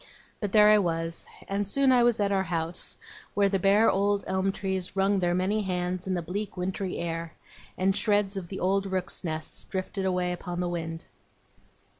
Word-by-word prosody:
But 205 -3 -3
there 210 0 +7
I 215 - +6
was; 165 -2 -2 0.2
and 200 0 -1
soon 270 +5 +3
I 250 -1 +5
was 240 -2 +3
at 200 -1 +1
our 195 -1 +2
house, 170 -1 -1 0.4
where 200 -1 +4
the 195 -1 +1
bare 200 +4 +4
old 200 +1 +2
elm 190 +1 0
trees 190 -2 -3
wrung 195 +1 +2
their 175 -1 +1
many 195 +4 +1
hands 180 0 -2
in 185 - 0
the 175 - -2
bleak 195 +4 -4
wintry 185 +1 -3
air, 165 -1 -4 0.4
and 190 +1 +2
shreds 205 -2 +1
of 190 -3 -4
the 190 - -6
old 195 +2 +1
rooks' 185 -1 -2
nests 160 -2 -3
drifted 190 0 -4
away 180 -1 0
upon 175 0 -5
the 180 -1 -1
wind. 165 -1 -4
190 Hz, 190 wpm, -28 LUFS, 175-200 Hz, 0.4 s, there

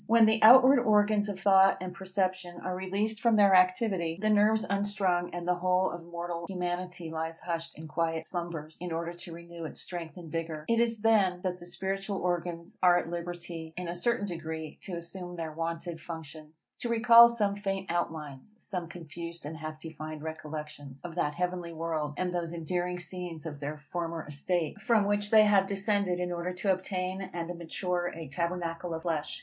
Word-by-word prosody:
When 230 0 +6
the 220 0 +3
outward 260 +4 +9
organs 210 -2 +3
of 195 -2 -4
thought 195 0 +6
and 185 -1 -5
perception 185 -2 -2
are 185 - -2
released 200 +4 -1
from 235 -1 +4
their 200 -2 +6
activity, 185 -2 +3
the 215 +1 +2
nerves 215 +1 +4
unstrung, 195 -3 0
and 175 0 -5
the 180 - +4
whole 185 +1 +2
of 170 -1 -7
mortal 170 0 -5
humanity 180 -2 -3
lies 160 0 -4
hushed 165 -1 -4
in 160 +1 -8
quiet 165 0 -1
slumbers, 165 -3 -5
in 180 -1 -4
order 165 +1 -2
to 175 0 -10
renew 170 0 -9
its - - -5
strength 175 -1 -6
and 165 -3 -9
vigour, 160 -2 -3
it 230 0 +3
is 230 -2 +1
then 200 -5 +3
that 180 -1 -2
the 175 - -8
spiritual 195 +2 -2
organs 175 -1 -3
are 180 -1 +6
at 170 -1 -2
liberty, 170 -2 -6
in 180 -1 -4
a 170 - -2
certain 205 +4 +1
degree, 160 -4 -5
to 190 - -7
assume 175 +1 -6
their 165 -2 -4
wonted 165 +1 -4
functions, 160 -1 -9
to 240 - -3
recall 235 0 +8
some 210 -4 +1
faint 195 -2 -2
outlines, 160 +1 -3
some 180 -6 -4
confused 170 -1 -8
and 155 +2 -5
half 155 -1 -6
defined 155 -1 -7
recollections, 150 -3 -7
of 175 - -6
that 150 -3 -1
heavenly 180 -1 -2
world, 155 -2 -2
and 180 -1 -1
those 170 -1 -2
endearing 175 +2 -2
scenes 175 -2 -5
of 150 -3 -6
their 145 +1 -4
former 170 -2 -3
estate, 165 +6 -2
from 220 -3 +3
which 205 0 +1
they 215 0 +8
have 200 -2 +4
descended 200 -2 +1
in 180 0 -2
order 175 +1 -2
to 190 +2 +1
obtain 185 0 -3
and 175 0 -4
mature 175 +1 -2
a 165 -1 -7
tabernacle 170 +2 -2
of 160 - -7
flesh. 160 -4 -2
175 Hz, 190 wpm, -30 LUFS, 165-195 Hz, -, outward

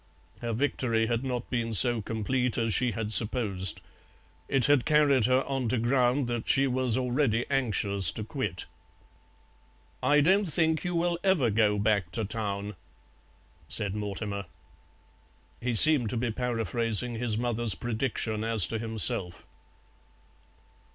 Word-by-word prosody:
Her 120 -1 -3
victory 115 -2 0
had 120 +2 -2
not 125 -3 -4
been 115 -2 -2
so 120 +2 +6
complete 115 +4 -2
as 115 -2 +1
she 125 0 +1
had 110 0 -2
supposed; 105 -6 +1 0.7
it 135 -3 +3
had 145 -4 +3
carried 145 -6 +3
her 130 +1 +2
on 135 -4 -3
to 125 - 0
ground 125 +3 +1
that 120 -1 -4
she 135 0 +3
was 130 -2 0
already 125 -2 0
anxious 105 - +1
to 110 - -6
quit. 105 - -4 1.4
"I 145 +3 +3
don't 190 +7 +3
think 160 -1 0
you 175 -1 -3
will 170 0 -1
ever 175 - +2
go 105 -1 +1
back 100 -3 0
to 110 - 0
Town," 100 -1 -4 0.9
said 95 +6 -2
Mortimer. 100 -1 -5 1.2
He 120 -1 -2
seemed 135 -2 +5
to 120 - -3
be 120 0 -2
paraphrasing 115 0 -1
his 115 -3 -1
mother's 120 -3 +1
prediction 115 -2 -3
as 115 -4 +2
to 115 - -3
himself. 110 -5 0
120 Hz, 140 wpm, -27 LUFS, 110-130 Hz, 1.4 s, so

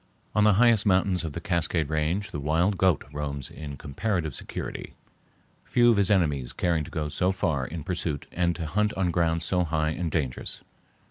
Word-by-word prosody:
On 105 - +3
the 105 - +6
highest 115 0 +5
mountains 95 -1 +2
of 80 -3 -4
the - - -4
Cascade 85 -3 0
Range 80 +6 -1
the 75 - -4
wild 80 +7 +1
goat 95 -5 +3
roams 70 -2 -4
in 70 -3 -7
comparative 80 - -2
security, - - -6 0.7
few 120 -1 +4
of 110 - +2
his 100 -2 +3
enemies 75 -11 +1
caring 85 -3 0
to - - -8
go 80 -4 -2
so 90 +5 +1
far 80 -9 -1
in 80 +1 -6
pursuit 85 -5 -3
and 85 0 0
to 85 -1 -4
hunt 105 +7 +1
on 95 -2 +1
ground 85 -1 +1
so 90 +1 +1
high 80 -2 0
and 85 +1 -2
dangerous. 70 -5 -3
85 Hz, 190 wpm, -27 LUFS, 75-95 Hz, 0.7 s, the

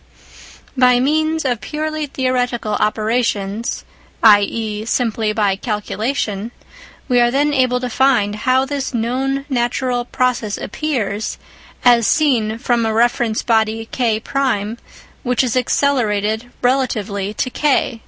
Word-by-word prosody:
By 250 -1 +4
means 310 +3 +1
of 245 -4 -1
purely 310 0 -3
theoretical 250 -4 -1
operations 215 0 -1 0.4
(i.e. 210 0 +3
simply 225 -2 0
by 210 -3 +1
calculation) 215 +1 -3 0.6
we 245 -2 +3
are 240 - +4
then 290 +4 +1
able 255 -2 +2
to 250 - -3
find 245 -5 +2
how 255 +4 +2
this 275 -2 -3
known 265 +4 -1
natural 245 -1 -1
process 250 -5 -1
appears, 220 -7 -3 0.5
as 235 -2 +5
seen 235 -8 +2
from 240 -1 0
a 225 - 0
reference 235 -1 +1
body 225 -1 +1
K1 230 -1 -1 0.4
which 250 -1 +1
is 250 -2 -1
accelerated 235 -4 0
relatively 220 -6 0
to 255 - -2
K. 270 -5 +1
240 Hz, 115 wpm, -18 LUFS, 215-260 Hz, 0.6 s, as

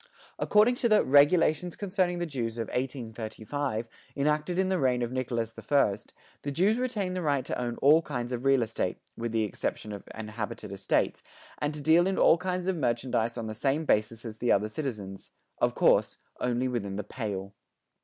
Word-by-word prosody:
According 210 +4 +4
to 235 - +1
the 215 -1 +5
"Regulations 155 +4 +4
Concerning 185 -3 0
the 175 - -1
Jews" 120 -7 -3
of 115 -2 -3
1835, 120 -1 -3 0.3
enacted 150 +4 0
in 190 0 +2
the 190 -1 +1
reign 125 -3 +2
of 120 - -3
Nicholas 120 -3 -2
the 115 - -11
First, 110 -3 +1 0.3
the 145 - -3
Jews 195 - +2
retained 210 -8 -2
the 185 - -2
right 145 -5 0
to - - -3
own 120 -1 -3
all 150 +4 +7
kinds 125 -6 -4
of 125 0 -3
real 135 -2 +4
estate, 110 0 -2 0.2
with 115 0 -3
the 110 -1 +1
exception 105 +1 -3
of 100 -1 -8
inhabited 110 -2 -6
estates 100 0 0 0.4
and 150 0 0
to 150 - -6
deal 165 +4 +5
in 195 - 0
all 165 - +5
kinds 180 0 -2
of 190 0 0
merchandise 120 -3 0
on 115 - -3
the 110 - -4
same 140 +8 0
basis 115 -1 +1
as 110 -1 -7
the 120 - +1
other 105 +2 +2
citizens, 105 -7 -5 0.3
of - - +1
course, - - +3 0.2
only 125 +1 0
within 105 -6 -3
the 105 - -3
"Pale." 100 -4 -5
130 Hz, 190 wpm, -28 LUFS, 115-160 Hz, 0.4 s, all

